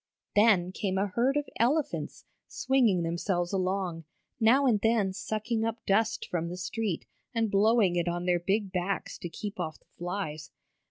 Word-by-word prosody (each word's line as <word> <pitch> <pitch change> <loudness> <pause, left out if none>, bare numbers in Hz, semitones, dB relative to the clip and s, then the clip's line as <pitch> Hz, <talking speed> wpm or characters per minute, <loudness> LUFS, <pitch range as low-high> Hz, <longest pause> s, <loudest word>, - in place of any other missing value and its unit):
Then 205 -4 +4
came 190 -1 -2
a 195 - +2
herd 250 +8 +1
of 290 - -1
elephants, 280 +6 0 0.2
swinging 235 -10 +2
themselves 175 +2 -1
along, 185 -3 -1 0.3
now 250 +5 +5
and 220 -6 +3
then 220 -4 +2
sucking 220 +3 -2
up 225 +1 -3
dust 220 +3 +1
from 170 -1 -2
the 180 - -6
street 200 0 -3 0.3
and 225 -2 +1
blowing 205 -2 +4
it 175 0 0
on 175 +1 -2
their 180 -1 +2
big 195 +2 0
backs 185 +1 -2
to 175 - -5
keep 205 +4 -6
off 160 -3 -3
the - - -34
flies. 175 -4 -4
195 Hz, 165 wpm, -29 LUFS, 175-225 Hz, 0.3 s, now